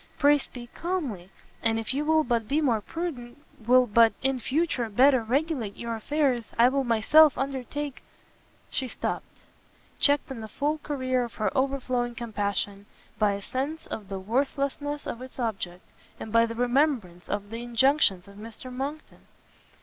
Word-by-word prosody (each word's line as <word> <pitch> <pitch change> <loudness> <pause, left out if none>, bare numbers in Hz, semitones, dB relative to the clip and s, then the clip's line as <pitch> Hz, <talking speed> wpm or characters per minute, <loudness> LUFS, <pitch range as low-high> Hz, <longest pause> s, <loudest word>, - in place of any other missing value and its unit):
pray 290 0 +5
speak 245 -3 -10
calmly; 285 - -3 0.3
and 225 -1 +1
if 225 +2 -2
you 285 +2 0
will 315 +1 +3
but 235 -5 0
be 285 +6 +1
more 240 -8 +2
prudent, 285 -5 -5 0.3
will 255 +1 +6
but, 230 0 +5
in 265 -1 +1
future, 265 -2 0
better 260 +4 +5
regulate 255 -3 -1
your 235 -1 -3
affairs, 255 -1 0
I 235 +2 +6
will 275 +1 0
myself 260 +6 +5
undertake 275 +1 -4 0.4
" - - -34
She 260 - -2
stopt; - - -3 0.7
checked 285 -1 +3
in 245 -4 -6
the 220 - -6
full 295 +7 -1
career 255 -4 -1
of 235 -3 -7
her 210 -3 -1
overflowing 255 -3 0
compassion, 205 -3 -3 0.3
by 210 -2 +3
a 200 0 -5
sense 285 +8 -3
of 205 -3 -7
the 195 - -3
worthlessness 280 +7 -2
of 235 - -5
its 260 0 -10
object; 195 -7 -3 0.4
and 220 - -7
by 230 +1 +5
the 230 - -6
remembrance 245 - 0
of 205 0 -3
the 230 +1 -5
injunctions 240 -5 +3
of 200 0 -14
Mr 230 +4 -9
Monckton. 280 +4 -6
245 Hz, 165 wpm, -27 LUFS, 225-280 Hz, 0.7 s, will